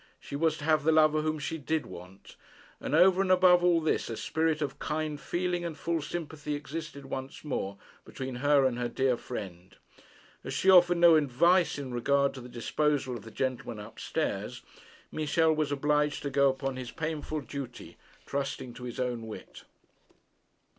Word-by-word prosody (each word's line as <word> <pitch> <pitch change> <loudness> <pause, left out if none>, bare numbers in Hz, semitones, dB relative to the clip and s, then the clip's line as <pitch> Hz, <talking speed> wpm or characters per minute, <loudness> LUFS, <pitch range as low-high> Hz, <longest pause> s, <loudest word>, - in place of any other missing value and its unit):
She - - -8
was 160 +1 +1
to - - -9
have 155 -1 +2
the 160 - +4
lover 155 -1 +4
whom 155 0 -1
she 160 +2 -4
did 155 +2 -1
want. 90 +3 -12 0.4
And, 150 - -2
over 185 +3 +6
and 195 - 0
above 180 -1 +6
all 175 -1 +4
this, 160 -5 0
a 115 - -4
spirit 160 -1 0
of 145 -3 -3
kind 155 -1 -3
feeling 175 0 -1
and 165 -3 -5
full 165 -1 -1
sympathy 150 -1 -4
existed 145 -1 -7
once 135 0 -6
more 100 -9 -3 0.3
between 130 -1 -6
her 145 +1 +4
and 125 -2 0
her 120 - 0
dear 130 +1 +1
friend. 95 -7 -8 0.7
As - - -5
she 190 - +4
offered 175 -1 +6
no 170 -1 +7
advice 165 +6 +3
in 135 -3 -6
regard 140 +3 +2
to 130 - -9
the 125 - -10
disposal 130 +2 -1
of 110 - -8
the 115 - -10
gentleman 125 -1 -3
up 105 +2 -10
stairs, - - -3 0.5
Michel 160 +1 +2
was 155 -2 -1
obliged 150 +1 +1
to 140 - -3
go 140 0 +4
upon 135 0 -3
his 125 -2 -6
painful 155 0 -4
duty, 135 -3 -8 0.3
trusting 135 -3 -4
to 125 - -9
his 120 - -6
own 120 -3 -2
wit. 105 -4 -10
145 Hz, 180 wpm, -29 LUFS, 130-160 Hz, 0.7 s, no